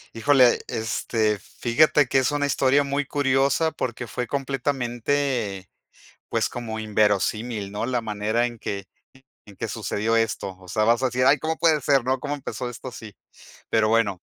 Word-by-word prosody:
Híjole, 130 Hz, 0 st, +4 dB
este, 110 Hz, -2 st, -1 dB
fíjate 135 Hz, -, +2 dB
que 135 Hz, -, +1 dB
es 130 Hz, +2 st, +2 dB
una 145 Hz, -1 st, 0 dB
historia 140 Hz, 0 st, +3 dB
muy 140 Hz, +1 st, -1 dB
curiosa, 140 Hz, +3 st, +1 dB
porque 120 Hz, -3 st, -4 dB
fue 125 Hz, +2 st, -4 dB
completamente, 130 Hz, -6 st, -2 dB, 0.6 s
pues, -, -, 0 dB
como 110 Hz, -2 st, -5 dB
inverosímil, 105 Hz, 0 st, 0 dB
¿no? 105 Hz, +3 st, -3 dB
La 125 Hz, -1 st, 0 dB
manera 110 Hz, +1 st, -1 dB
en 120 Hz, -1 st, -7 dB
que 100 Hz, -2 st, -5 dB, 0.6 s
en 100 Hz, -2 st, -14 dB
que 115 Hz, +4 st, -4 dB
sucedió 110 Hz, +1 st, -1 dB
esto. 110 Hz, -4 st, -1 dB
O 95 Hz, -1 st, -16 dB
sea, 110 Hz, +4 st, +1 dB
vas 115 Hz, +3 st, +3 dB
a -, -, +3 dB
decir: 125 Hz, 0 st, 0 dB
"Ay, 140 Hz, +3 st, +5 dB
¿cómo 160 Hz, +3 st, -2 dB
puede 160 Hz, -3 st, +3 dB
ser?, 135 Hz, -2 st, +2 dB
¿no?, 130 Hz, +1 st, 0 dB
¿cómo 145 Hz, +3 st, -3 dB
empezó 130 Hz, -3 st, -5 dB
esto 125 Hz, +2 st, -8 dB
así?". 110 Hz, -3 st, -10 dB, 0.6 s
Pero 110 Hz, -1 st, +3 dB
bueno. 110 Hz, -5 st, +1 dB
120 Hz, 165 wpm, -24 LUFS, 110-135 Hz, 0.6 s, Ay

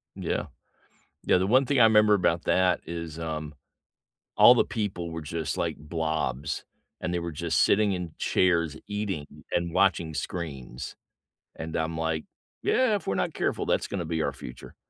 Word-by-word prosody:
Yeah, -, -, -2 dB, 0.8 s
yeah, -, -, +4 dB
the 95 Hz, +1 st, +1 dB
one 130 Hz, +4 st, +5 dB
thing 140 Hz, -2 st, +2 dB
I -, -, +8 dB
remember 105 Hz, -1 st, +6 dB
about 85 Hz, -3 st, +1 dB
that 90 Hz, -2 st, +3 dB
is, 85 Hz, -1 st, -6 dB
um, 75 Hz, -2 st, -4 dB, 0.8 s
all -, -, +9 dB
the -, -, +3 dB
people 95 Hz, -6 st, -3 dB
were 80 Hz, 0 st, -5 dB
just, 80 Hz, 0 st, -3 dB
like, -, -, -1 dB
blobs, 80 Hz, -2 st, -2 dB, 0.4 s
and 90 Hz, -, -2 dB
they 90 Hz, -, 0 dB
were 85 Hz, -1 st, -4 dB
just 80 Hz, +2 st, 0 dB
sitting 105 Hz, 0 st, +4 dB
in 90 Hz, -3 st, -4 dB
chairs, 85 Hz, -4 st, +2 dB
eating 100 Hz, -8 st, -3 dB, 0.3 s
and 85 Hz, -1 st, -1 dB
watching 85 Hz, -5 st, +2 dB
screens, 70 Hz, -5 st, -5 dB, 0.6 s
and 80 Hz, 0 st, -6 dB
I'm 80 Hz, 0 st, -1 dB
like, 80 Hz, -1 st, -1 dB, 0.4 s
"Yeah, 255 Hz, -4 st, +3 dB
If 200 Hz, -, -5 dB
we're 95 Hz, -, 0 dB
not -, -, -1 dB
careful, -, -, -1 dB
that's -, -, +1 dB
gonna 95 Hz, -4 st, -3 dB
be 80 Hz, 0 st, -1 dB
our -, -, -1 dB
future," 60 Hz, 0 st, -10 dB
85 Hz, 170 wpm, -27 LUFS, 80-95 Hz, 0.8 s, all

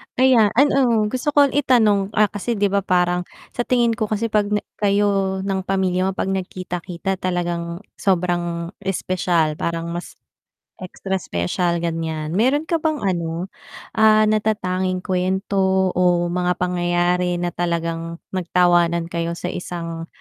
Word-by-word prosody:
Ayan, 250 Hz, -5 st, +5 dB
ano, 255 Hz, -5 st, +4 dB
gusto 255 Hz, +3 st, -1 dB
ko 285 Hz, -2 st, +5 dB
itanong, 220 Hz, -8 st, +2 dB
ah, 210 Hz, -2 st, +3 dB
kasi 220 Hz, +3 st, -2 dB
'di 200 Hz, -1 st, +1 dB
ba? 200 Hz, -, +3 dB
Parang 180 Hz, -2 st, +1 dB, 0.2 s
sa 240 Hz, -, -3 dB
tingin 240 Hz, -2 st, +3 dB
ko 215 Hz, -1 st, -2 dB
kasi 215 Hz, +1 st, -2 dB
pag 210 Hz, -1 st, +2 dB
na 210 Hz, 0 st, -1 dB, 0.2 s
kayo 200 Hz, -2 st, +1 dB
ng 195 Hz, -1 st, -1 dB
pamilya 190 Hz, -1 st, +1 dB
mo -, -, 0 dB
pag 190 Hz, -, -1 dB
nagkita-kita 185 Hz, 0 st, -4 dB
talagang 175 Hz, 0 st, -3 dB, 0.2 s
sobrang 175 Hz, -2 st, 0 dB
espesyal, 180 Hz, -5 st, 0 dB
parang 170 Hz, 0 st, -2 dB
mas 175 Hz, +1 st, -6 dB, 0.6 s
extra 190 Hz, +1 st, -4 dB
special 170 Hz, -, -1 dB
ganyan. 160 Hz, -2 st, -3 dB
Meron 265 Hz, +7 st, +2 dB
ka 330 Hz, 0 st, -1 dB
bang 310 Hz, -4 st, -1 dB
ano, 175 Hz, -1 st, -2 dB, 0.5 s
ah, 215 Hz, 0 st, +6 dB
natatanging 185 Hz, -4 st, 0 dB
kwento 190 Hz, 0 st, +1 dB
o 175 Hz, -1 st, +2 dB
mga 180 Hz, 0 st, +1 dB
pangyayari 180 Hz, 0 st, 0 dB
na 175 Hz, 0 st, -2 dB
talagang 165 Hz, -1 st, -2 dB, 0.2 s
nag 185 Hz, -3 st, -3 dB
tawanan 175 Hz, -1 st, +3 dB
kayo 170 Hz, 0 st, -2 dB
sa 180 Hz, +1 st, -4 dB
isang, 165 Hz, -2 st, -5 dB
185 Hz, 140 wpm, -21 LUFS, 175-205 Hz, 0.6 s, ah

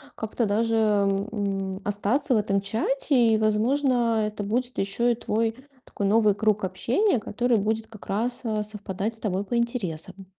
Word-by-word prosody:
как-то 220 Hz, +1 st, -2 dB
даже, 225 Hz, +2 st, +1 dB
м, 200 Hz, -2 st, 0 dB
остаться 205 Hz, +7 st, 0 dB
в -, -, +4 dB
этом 200 Hz, -1 st, +1 dB
чате. 250 Hz, -, +2 dB
И, -, -, +2 dB
возможно, 230 Hz, +1 st, +2 dB
это 210 Hz, -1 st, -5 dB
будет 245 Hz, +5 st, -2 dB
еще 235 Hz, +5 st, +2 dB
и -, -, -5 dB
твой 225 Hz, 0 st, -1 dB, 0.3 s
такой 200 Hz, -, -4 dB
новый 210 Hz, -1 st, +4 dB
круг 210 Hz, -1 st, +1 dB
общения, 235 Hz, -, +1 dB
который 240 Hz, +2 st, 0 dB
будет 220 Hz, +2 st, -1 dB
как 220 Hz, -2 st, -13 dB
раз, 235 Hz, +5 st, -1 dB
а, 215 Hz, -1 st, -1 dB
совпадать 210 Hz, +1 st, -4 dB
с -, -, -10 dB
тобой 195 Hz, -2 st, -1 dB
по 240 Hz, +3 st, -1 dB
интересам. 195 Hz, -6 st, -3 dB
215 Hz, 160 wpm, -25 LUFS, 200-235 Hz, 0.3 s, в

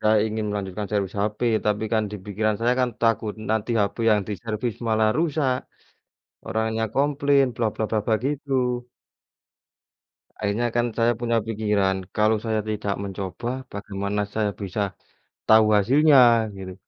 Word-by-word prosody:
Saya 110 Hz, 0 st, +4 dB
ingin 110 Hz, 0 st, -3 dB
melanjutkan 100 Hz, 0 st, -4 dB
servis 100 Hz, -2 st, -1 dB
hape, 105 Hz, +3 st, -1 dB, 0.2 s
tapi 105 Hz, +1 st, +1 dB
kan 110 Hz, -1 st, +3 dB
di 105 Hz, -, -5 dB
pikiran 110 Hz, +1 st, 0 dB
saya 120 Hz, +2 st, +2 dB
kan 125 Hz, -, +1 dB
takut. 115 Hz, -2 st, +1 dB, 0.2 s
Nanti 110 Hz, +1 st, 0 dB
hape 100 Hz, +3 st, -1 dB
yang 105 Hz, -1 st, +4 dB
diservis 110 Hz, +3 st, -3 dB
malah 110 Hz, 0 st, +3 dB
rusak, 150 Hz, -5 st, +1 dB, 0.9 s
orangnya 110 Hz, 0 st, -1 dB
komplain 140 Hz, 0 st, +3 dB
bla 115 Hz, -1 st, 0 dB
bla 110 Hz, -, -2 dB
bla 110 Hz, -, +1 dB
bla, 110 Hz, -, +3 dB
gitu. 130 Hz, -4 st, -1 dB, 1.5 s
Akhirnya 105 Hz, +3 st, 0 dB
kan 120 Hz, -, +2 dB
saya 115 Hz, +1 st, +4 dB
punya 115 Hz, -1 st, +1 dB
pikiran, 105 Hz, -3 st, +1 dB, 0.2 s
kalau 110 Hz, +1 st, +3 dB
saya 110 Hz, -1 st, 0 dB
tidak 105 Hz, -1 st, -2 dB
mencoba, 100 Hz, +4 st, -5 dB, 0.2 s
bagaimana 100 Hz, 0 st, -3 dB
saya 110 Hz, -2 st, +1 dB
bisa, 100 Hz, +1 st, -3 dB, 0.7 s
tahu 110 Hz, 0 st, +7 dB
hasilnya, 140 Hz, +7 st, +5 dB, 0.4 s
gitu. 95 Hz, -1 st, -7 dB
110 Hz, 140 wpm, -24 LUFS, 105-120 Hz, 1.5 s, tahu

